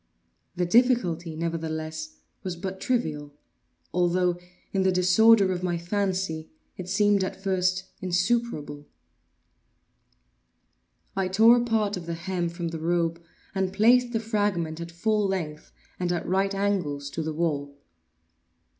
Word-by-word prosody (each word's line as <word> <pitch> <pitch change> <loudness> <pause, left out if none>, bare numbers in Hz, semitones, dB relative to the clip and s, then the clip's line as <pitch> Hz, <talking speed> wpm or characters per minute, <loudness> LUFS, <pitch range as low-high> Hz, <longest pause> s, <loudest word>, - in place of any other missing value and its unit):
The 180 - 0
difficulty, 180 -7 +2
nevertheless, 160 -1 -4 0.3
was 185 -2 -4
but 190 +2 -6
trivial; 150 - -2 0.6
although, 180 0 +2 0.3
in 195 - +2
the 190 0 +3
disorder 190 +3 +5
of 180 -1 -2
my 175 -2 -1
fancy, 185 -3 -2 0.3
it 185 0 -7
seemed 205 +1 +3
at 190 - -3
first 185 -1 0 0.2
insuperable. 180 -6 -1 2.3
I 190 -1 0
tore 220 +6 +6
a 240 - +1
part 215 -4 0
of 170 -2 -8
the 170 - -2
hem 175 0 -2
from 170 0 -4
the 165 -1 -5
robe 170 0 0 0.3
and 190 -1 0
placed 240 +5 +4
the 225 - 0
fragment 205 -7 -1
at 170 - -6
full 210 +4 +1
length, 160 -6 -4 0.3
and 180 -1 0
at 175 - -2
right 195 +2 +1
angles 170 -9 -1
to 165 - -3
the 160 0 -3
wall. 145 -4 -2
180 Hz, 135 wpm, -26 LUFS, 165-200 Hz, 2.3 s, tore